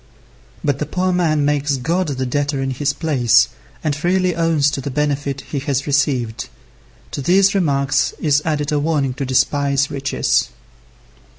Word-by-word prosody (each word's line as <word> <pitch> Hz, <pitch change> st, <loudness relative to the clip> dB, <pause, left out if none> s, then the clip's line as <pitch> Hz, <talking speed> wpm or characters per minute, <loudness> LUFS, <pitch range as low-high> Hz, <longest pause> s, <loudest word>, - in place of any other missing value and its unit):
But 145 Hz, -2 st, 0 dB
the 150 Hz, -, -2 dB
poor 185 Hz, +3 st, 0 dB
man 155 Hz, -5 st, +1 dB
makes 145 Hz, -1 st, +1 dB
God 170 Hz, +8 st, -1 dB
the 130 Hz, -3 st, -2 dB
debtor 145 Hz, +2 st, -1 dB
in 135 Hz, 0 st, -1 dB
his 140 Hz, +2 st, 0 dB
place, 130 Hz, -6 st, +3 dB, 0.3 s
and 150 Hz, -2 st, 0 dB
freely 180 Hz, +3 st, +1 dB
owns 160 Hz, -4 st, +2 dB
to 135 Hz, -, -3 dB
the 140 Hz, -, -4 dB
benefits 140 Hz, -1 st, -2 dB
he 145 Hz, -, -4 dB
has 135 Hz, 0 st, -2 dB
received. 135 Hz, -6 st, 0 dB, 0.6 s
To -, -, -4 dB
these 190 Hz, +6 st, +4 dB
remarks 140 Hz, -8 st, +1 dB
is 150 Hz, -1 st, +2 dB
added 150 Hz, -1 st, -1 dB
a 150 Hz, -, +1 dB
warning 145 Hz, -4 st, 0 dB
to 135 Hz, +1 st, -4 dB
despise 140 Hz, +1 st, +1 dB
riches. 135 Hz, -1 st, 0 dB
145 Hz, 160 wpm, -19 LUFS, 135-155 Hz, 0.6 s, these